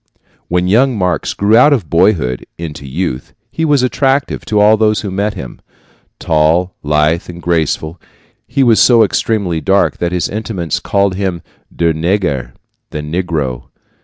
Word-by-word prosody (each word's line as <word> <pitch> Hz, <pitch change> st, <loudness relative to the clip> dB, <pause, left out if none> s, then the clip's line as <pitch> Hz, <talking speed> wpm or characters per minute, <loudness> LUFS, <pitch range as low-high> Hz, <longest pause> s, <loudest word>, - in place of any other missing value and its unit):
When 90 Hz, +1 st, 0 dB
young 120 Hz, +5 st, +3 dB
Marx 90 Hz, -2 st, -1 dB
grew 105 Hz, +2 st, +2 dB
out 135 Hz, +5 st, +6 dB
of 110 Hz, -, -1 dB
boyhood 80 Hz, -, +1 dB
into 75 Hz, -4 st, -7 dB
youth, 70 Hz, -2 st, -4 dB, 0.2 s
he 160 Hz, -, -3 dB
was 145 Hz, -4 st, +2 dB
attractive 135 Hz, +2 st, 0 dB
to 105 Hz, -2 st, 0 dB
all 105 Hz, +1 st, +6 dB
those 110 Hz, -1 st, +1 dB
who 100 Hz, -, -5 dB
met 100 Hz, +2 st, -2 dB
him. 65 Hz, -9 st, -9 dB, 0.6 s
Tall, 80 Hz, +4 st, +1 dB
lithe, 75 Hz, +3 st, 0 dB
and 85 Hz, -1 st, -8 dB
graceful, 80 Hz, -1 st, -1 dB, 0.5 s
he 140 Hz, -, +1 dB
was 115 Hz, -3 st, +4 dB
so 120 Hz, -3 st, +6 dB
extremely 100 Hz, -10 st, -1 dB
dark 100 Hz, +3 st, +1 dB
that 85 Hz, 0 st, -2 dB
his 90 Hz, -3 st, -1 dB
intimates 100 Hz, -7 st, -3 dB
called 100 Hz, -1 st, 0 dB
him 95 Hz, -3 st, -3 dB, 0.3 s
"der 85 Hz, -1 st, 0 dB
neger" 80 Hz, -7 st, -1 dB, 0.4 s
"the 75 Hz, -, -5 dB
negro." 75 Hz, -5 st, -3 dB
90 Hz, 155 wpm, -14 LUFS, 80-105 Hz, 0.6 s, out